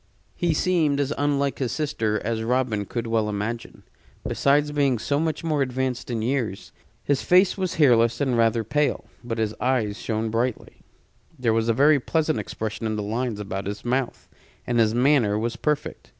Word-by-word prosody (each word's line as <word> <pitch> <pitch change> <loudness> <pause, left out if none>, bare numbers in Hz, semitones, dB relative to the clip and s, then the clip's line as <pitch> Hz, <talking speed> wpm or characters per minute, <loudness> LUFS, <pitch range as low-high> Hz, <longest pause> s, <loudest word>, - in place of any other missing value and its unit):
He 170 -3 0
seemed 155 -5 +2
as 140 +1 0
unlike 140 -1 0
his 130 -4 -1
sister 110 -8 -1
as 115 0 -1
Robin 115 -3 0
could 120 -1 -3
well 115 -2 0
imagine, 105 +3 -4 0.4
besides 145 +1 +2
being 140 -4 +2
so 140 +6 -1
much 160 +1 -2
more 155 -3 0
advanced 130 -1 -2
in 115 -2 -2
years. 120 -6 -2 0.3
His 140 -2 +1
face 180 +1 +4
was 185 -3 -2
hairless 120 -6 +4
and 130 -4 +1
rather 115 0 +2
pale; 145 +7 0 0.2
but 120 -1 -4
his 110 -1 -1
eyes 120 -5 0
shone 110 0 -2
brightly. 120 +2 -2 0.6
There 120 -4 +1
was 115 +1 +1
a - - +4
very 145 +4 +5
pleasant 155 +3 0
expression 110 +1 -4
in 110 - -2
the 105 - -3
lines 115 +1 -2
about 100 -1 -4
his 100 +2 -6
mouth, 125 +1 -2 0.4
and 120 -1 0
his 110 0 +3
manner 125 -5 +3
was 115 +2 -2
perfect. 150 -1 -3
125 Hz, 180 wpm, -24 LUFS, 110-145 Hz, 0.6 s, very